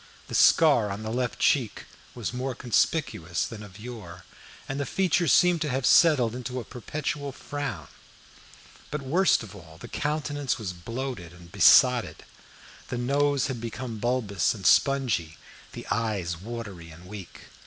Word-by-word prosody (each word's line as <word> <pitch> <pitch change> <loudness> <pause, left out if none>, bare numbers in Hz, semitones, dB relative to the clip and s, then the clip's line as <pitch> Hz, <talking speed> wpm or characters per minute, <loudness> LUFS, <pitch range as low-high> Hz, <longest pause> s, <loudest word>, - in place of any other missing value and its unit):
The - - -7
scar 140 -10 +5
on 100 +2 -5
the 110 - -4
left 125 +1 -2
cheek 125 -7 +1 0.3
was 120 -1 -4
more 130 +1 -3
conspicuous 115 - 0
than 115 -2 -8
of 100 -3 -12
yore, 105 -7 -9 0.4
and 135 +1 -4
the 145 - -1
features 175 -2 +1
seemed 180 -2 +4
to 155 - -1
have 130 -1 -1
settled 135 -9 +5
into 125 +1 -5
a - - -5
perpetual 140 +4 -4
frown. 145 +2 -5 1.0
But, 150 -1 -4
worst 170 +2 +3
of 105 -3 -11
all, 80 -4 -13
the - - -10
countenance 145 -3 -2
was 100 -5 -5
bloated 115 -1 -6
and 85 -1 -15
besotted. 125 - +5 0.6
The 125 - -4
nose 140 +3 +1
had 130 -5 -4
become 115 0 -5
bulbous 110 - 0
and - - -10
spongy, 115 - +2 0.4
the - - -8
eyes 105 -7 -1
watery 100 -3 -8
and 85 +3 -13
weak. 95 -2 -10
120 Hz, 155 wpm, -26 LUFS, 100-140 Hz, 1.0 s, scar